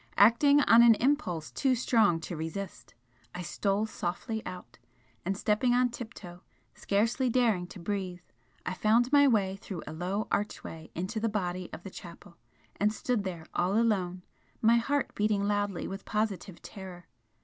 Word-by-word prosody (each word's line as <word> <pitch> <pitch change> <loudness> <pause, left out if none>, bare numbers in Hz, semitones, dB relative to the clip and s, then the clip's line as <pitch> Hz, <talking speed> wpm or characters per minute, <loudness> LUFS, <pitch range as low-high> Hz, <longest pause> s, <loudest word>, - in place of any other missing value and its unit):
Acting 280 +8 +6
on 230 -4 +7
an 235 -1 +8
impulse 215 - 0
too 265 -2 +1
strong 220 -8 +3
to 170 - -5
resist, 160 - -6 0.4
I 180 - -4
stole 200 +4 0
softly 220 +2 -4
out, 180 -1 -9 0.4
and 190 +2 -2
stepping 230 +4 +2
on 250 0 +3
tiptoe, 190 -7 -9 0.3
scarcely 230 +6 0
daring 225 -7 +2
to 190 - -11
breathe, 185 -1 -4 0.4
I - - -2
found 230 +6 +2
my 285 -1 +6
way 195 -6 +2
through 195 -4 -7
a - - -7
low 185 +6 -2
archway 165 -5 -3
into 190 +6 -3
the 225 +1 0
body 180 -3 -3
of 175 - -9
the 195 - -8
chapel, 170 0 -12 0.4
and 210 +1 +2
stood 220 0 -1
there 175 -4 -5
all 185 +4 +1
alone, 185 -6 0 0.4
my 230 +1 +5
heart 275 +4 0
beating 210 -1 +1
loudly 205 -3 -1
with 195 +1 -6
positive 210 -4 -3
terror. 185 -3 -9
205 Hz, 160 wpm, -29 LUFS, 180-230 Hz, 0.4 s, an